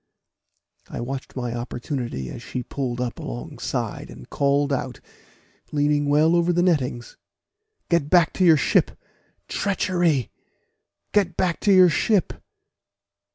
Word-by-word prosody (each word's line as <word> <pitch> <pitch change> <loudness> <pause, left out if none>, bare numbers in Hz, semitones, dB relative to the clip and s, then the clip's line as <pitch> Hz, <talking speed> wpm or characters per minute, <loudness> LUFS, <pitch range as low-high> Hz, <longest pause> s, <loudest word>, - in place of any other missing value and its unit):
I - - -6
watched 130 +3 -6
my 120 -2 -3
opportunity 120 - -4
as - - -8
she 125 - -5
pulled 125 -1 -4
up 125 -3 -3
alongside, - - -5
and 60 - -12
called 140 0 +1
out, 130 -1 -3 0.7
leaning 145 0 +1
well 155 +3 +4
over 170 0 +2
the 175 0 +2
nettings, 130 -9 -1 0.7
"Get 170 -4 +1
back 175 -1 +4
to 185 - 0
your 165 -3 +6
ship! - - +1 0.5
treachery! 175 - 0 0.8
get 190 -5 +1
back 180 -3 0
to 205 - +2
your 185 -2 +7
ship!" 195 +4 +1
145 Hz, 125 wpm, -23 LUFS, 125-175 Hz, 0.8 s, your